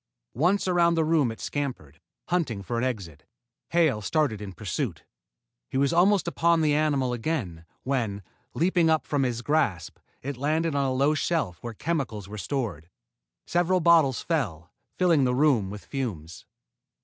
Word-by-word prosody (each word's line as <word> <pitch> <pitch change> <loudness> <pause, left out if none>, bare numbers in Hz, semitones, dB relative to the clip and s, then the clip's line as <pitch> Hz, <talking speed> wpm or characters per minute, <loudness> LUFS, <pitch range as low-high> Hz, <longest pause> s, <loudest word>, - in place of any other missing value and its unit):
Once 180 - +1
around 170 -2 +3
the 160 -1 +2
room 155 -6 +2
it 110 - -10
scampered, 130 - -5 0.3
hunting 145 - -1
for 115 +6 -2
an - - -1
exit. 95 - -4 0.5
Hale 160 -10 +2
started 125 -3 0
in 100 -2 -6
pursuit. 95 -2 -4 0.7
He - - -2
was 140 +4 +2
almost 185 +2 +4
upon 170 -1 +2
the 150 -2 +3
animal 145 -4 +1
again, 110 - -3 0.2
when, 115 -7 -2 0.3
leaping 170 -1 +2
up 160 -1 +2
from 145 -2 0
his 120 -2 -1
grasp, 110 - 0 0.2
it 140 -1 -4
landed 155 +4 0
on 140 -1 +1
a - - 0
low 140 +4 +2
shelf 155 - -1
where 120 -2 -6
chemicals 125 - -3
were 105 +1 -7
stored. 95 - -3 0.6
Several 175 +1 +2
bottles 160 -6 +4
fell, 95 - -2 0.3
filling 170 -6 +4
the 125 -1 +1
room 130 -9 +3
with 105 +1 -9
fumes. 90 - -5
135 Hz, 160 wpm, -26 LUFS, 105-160 Hz, 0.7 s, almost